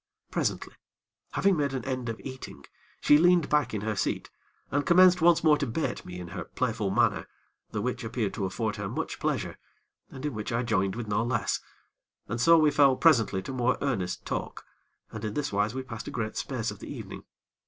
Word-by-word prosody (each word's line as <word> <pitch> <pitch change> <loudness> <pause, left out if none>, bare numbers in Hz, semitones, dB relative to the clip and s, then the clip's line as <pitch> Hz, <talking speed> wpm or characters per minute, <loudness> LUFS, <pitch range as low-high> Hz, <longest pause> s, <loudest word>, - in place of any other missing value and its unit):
Presently, - - -1 0.6
having 195 -1 +3
made 140 -3 0
an 125 - -4
end 130 -3 -3
of 115 - -5
eating, 130 -1 -9 0.4
she 145 - +6
leaned 175 -2 +4
back 150 -1 +2
in 105 - -3
her 110 0 -2
seat - - -2 0.4
and 145 +1 +1
commenced 180 +1 +6
once 170 -1 +5
more 150 -2 +5
to 140 - -1
bait 135 +8 -2
me 90 0 -7
in 90 -1 -7
her - - -6
playful - - -1
manner, - - +2 0.4
the 105 - -3
which 125 0 -2
appeared 115 -2 -2
to 100 - -2
afford 105 +4 -2
her 100 -1 -4
much - - -4
pleasure, - - -2 0.5
and 135 +2 -8
in 150 - -2
which 110 0 -4
I 115 +1 0
joined 95 -5 0
with 115 -2 -5
no 105 +2 +1
less, 120 - 0 0.7
and 115 +2 -3
so 165 +5 +7
we 155 -2 +4
fell 140 -2 +5
presently 115 - +3
to 135 - -6
more 125 0 +1
earnest 95 -10 -2
talk, - - -4 0.5
and 110 -1 -7
in 105 -1 -3
this 150 -7 -2
wise 105 +4 +1
we 130 - -3
passed 115 -3 -8
a - - -4
great 110 -2 -3
space 115 -5 -2
of 105 - -10
the - - -8
evening. - - -8
125 Hz, 205 wpm, -28 LUFS, 105-145 Hz, 0.7 s, so